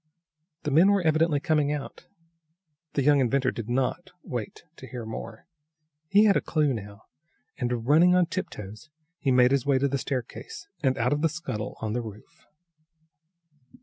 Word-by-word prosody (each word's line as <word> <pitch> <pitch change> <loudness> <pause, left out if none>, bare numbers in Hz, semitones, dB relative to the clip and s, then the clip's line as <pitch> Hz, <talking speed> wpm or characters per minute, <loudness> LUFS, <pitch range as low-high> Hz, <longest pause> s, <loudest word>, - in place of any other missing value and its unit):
The 150 - -2
men 165 +8 +6
were 200 -2 +3
evidently 160 -1 +2
coming 150 -1 +1
out. 150 -2 -6 0.9
The 140 - 0
young 145 +1 +5
inventor 130 0 +2
did 115 -1 -7
not 125 +1 -1
wait - - -6
to - - -10
hear 120 -3 -7
more. 110 0 -8 0.6
He 200 +5 +5
had 205 -2 +5
a - - +2
clue 150 -4 +1
now, 100 -2 -8 0.6
and, 120 -2 -2
running 165 +6 +5
on 180 -1 +4
tiptoes, 110 - -6 0.3
he 140 - -1
made 125 0 +5
his 140 0 +1
way 140 -2 +4
to 140 +2 +2
the 140 0 -1
staircase 130 +7 -5
and 130 -3 +1
out 125 +4 +1
of 145 - -1
the 165 - +3
scuttle 145 -10 -5
on 110 -1 -2
the 120 - -1
roof. 105 -2 -12
140 Hz, 170 wpm, -26 LUFS, 120-155 Hz, 0.9 s, men